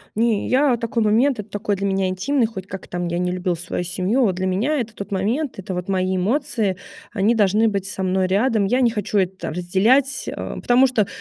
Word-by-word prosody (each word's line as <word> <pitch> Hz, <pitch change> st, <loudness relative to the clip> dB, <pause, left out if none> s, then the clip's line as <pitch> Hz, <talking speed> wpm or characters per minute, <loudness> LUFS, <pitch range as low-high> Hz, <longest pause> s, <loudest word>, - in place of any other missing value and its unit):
Не, 225 Hz, -1 st, +1 dB
я 265 Hz, 0 st, +3 dB
такой 230 Hz, 0 st, -1 dB
момент 235 Hz, +4 st, +2 dB
это 210 Hz, 0 st, -7 dB
такой 205 Hz, 0 st, -2 dB
для 200 Hz, +1 st, -1 dB
меня 190 Hz, -1 st, 0 dB
интимный, 230 Hz, +8 st, +1 dB
хоть 195 Hz, -4 st, -7 dB
как 195 Hz, -2 st, -8 dB
там 175 Hz, 0 st, -3 dB
я 170 Hz, -, -2 dB
ни 180 Hz, 0 st, 0 dB
любила 180 Hz, 0 st, -1 dB
свою 175 Hz, +1 st, -4 dB
семью, 190 Hz, +8 st, 0 dB
вот 190 Hz, -5 st, +1 dB
для 185 Hz, +1 st, -2 dB
меня 220 Hz, +12 st, 0 dB
это 225 Hz, -2 st, -6 dB
тот 200 Hz, -1 st, -7 dB
момент, 230 Hz, +9 st, -1 dB
это 190 Hz, 0 st, -5 dB
вот 180 Hz, +1 st, -4 dB
мои 185 Hz, -1 st, 0 dB
эмоции, 215 Hz, -1 st, 0 dB, 0.4 s
они 220 Hz, +2 st, +2 dB
должны 215 Hz, +1 st, +3 dB
быть 200 Hz, -2 st, -2 dB
со 190 Hz, -1 st, -4 dB
мной 185 Hz, 0 st, +1 dB
рядом. 210 Hz, +2 st, +2 dB
Я 250 Hz, +6 st, +1 dB
не 245 Hz, -, +4 dB
хочу 210 Hz, -1 st, -1 dB
это 190 Hz, 0 st, -1 dB
там -, -, -5 dB
разделять, 210 Hz, -, +2 dB
э, -, -, -3 dB, 0.3 s
потому 250 Hz, +2 st, +4 dB
что 220 Hz, -6 st, +1 dB
200 Hz, 225 wpm, -21 LUFS, 185-235 Hz, 0.4 s, не